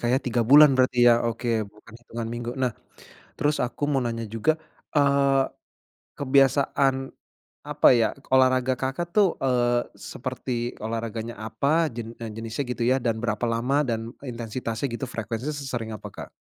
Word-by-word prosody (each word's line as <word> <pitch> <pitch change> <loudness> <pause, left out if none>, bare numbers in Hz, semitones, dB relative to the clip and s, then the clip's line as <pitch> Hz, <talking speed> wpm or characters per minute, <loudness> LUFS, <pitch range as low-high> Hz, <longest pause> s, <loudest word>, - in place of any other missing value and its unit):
Kak, 120 - 0
ya, - - +3
3 120 -1 +1
bulan 145 +5 +8
berarti, 130 -2 +3
ya? 120 -1 +6
Oke, 115 0 -1
bukan 105 +2 -10
hitungan 120 -1 -6
minggu. 120 0 -4
Nah, 130 -2 0 0.7
terus 145 -2 +1
aku 125 +4 -2
mau 135 -3 +1
nanya 115 -1 -3
juga, 115 +9 0 0.3
eee, 140 -2 +3 0.7
kebiasaan, 135 -1 +2 0.6
apa - - +4
ya, 115 -3 +3 0.2
olahraga 130 0 +4
Kakak 150 +6 -3
tuh, 200 -5 +3
eee, 120 -2 +2
seperti 125 -1 -4
olahraganya 115 +1 -4
apa? 140 +9 0
Jen 115 0 -7
eee, 115 -2 -6
jenisnya, 115 +5 -4
gitu 125 0 -5
ya, 130 - +4
dan 115 -3 -1
berapa 110 -1 -1
lama? 125 +5 +1
Dan, 115 -2 -3 0.2
intensitasnya, 115 +1 -4
gitu, 120 +2 -4
frekuensinya 115 +3 -4
sesering 125 -6 -4
apa 105 - -7
Kak? - - -9
120 Hz, 155 wpm, -25 LUFS, 115-135 Hz, 0.7 s, bulan